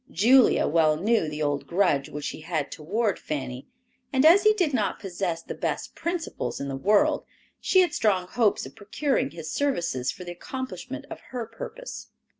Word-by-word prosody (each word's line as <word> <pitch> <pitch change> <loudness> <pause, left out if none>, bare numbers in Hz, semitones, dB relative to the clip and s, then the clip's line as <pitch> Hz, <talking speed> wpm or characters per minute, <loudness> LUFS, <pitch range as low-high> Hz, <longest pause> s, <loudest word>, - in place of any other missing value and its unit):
Julia 250 +5 +5
well 155 -1 +3
knew 210 0 +2
the 150 0 -3
old 145 -1 -1
grudge 170 -7 +2
which 150 0 -4
he - - -8
had 155 -3 -2
toward 200 +7 -1
Fanny, 130 -4 -5 0.4
and 265 +1 +3
as 345 +5 +8
he 430 +1 +5
did 350 -8 +1
not 210 -6 0
possess 175 -3 -3
the - - -6
best - - -3
principles 330 - -3
in 140 - -4
the 135 - -3
world, 205 +9 +3 0.4
she 375 - +4
had 350 -4 +1
strong 190 -4 +1
hopes 220 - +1
of 135 - -11
procuring 265 +5 -1
his 160 - -7
services 170 - 0
for 185 - -9
the 175 - -6
accomplishment 260 +9 -6
of - - -6
her 245 -3 -4
purpose. 360 - -8
195 Hz, 180 wpm, -26 LUFS, -, 0.4 s, as